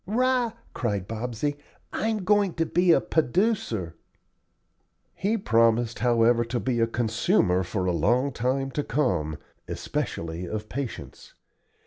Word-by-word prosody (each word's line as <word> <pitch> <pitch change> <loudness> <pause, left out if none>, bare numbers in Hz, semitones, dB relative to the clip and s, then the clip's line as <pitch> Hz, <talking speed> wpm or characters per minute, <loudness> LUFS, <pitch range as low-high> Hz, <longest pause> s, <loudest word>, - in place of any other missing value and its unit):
"'Rah!" 245 +1 +1 0.2
cried 100 -6 -2
Bobsey, 120 +6 -3 0.4
"I'm 220 -3 -1
goin' 200 -1 +2
to 165 - +1
be 175 +2 +3
a - - +6
p'oducer." 155 - 0 1.2
He 215 +4 0
promised, 115 - +2
however, 120 0 +3
to 120 +1 -2
be 125 -2 -1
a 115 - +3
consumer 115 - +1
for 95 +1 -2
a 90 - +2
long 120 - +2
time 130 +3 -1
to 145 - -2
come, 80 - 0 0.3
especially 85 +2 -4
of 110 +3 -5
patience. 135 -2 -6
120 Hz, 125 wpm, -26 LUFS, 110-165 Hz, 1.2 s, a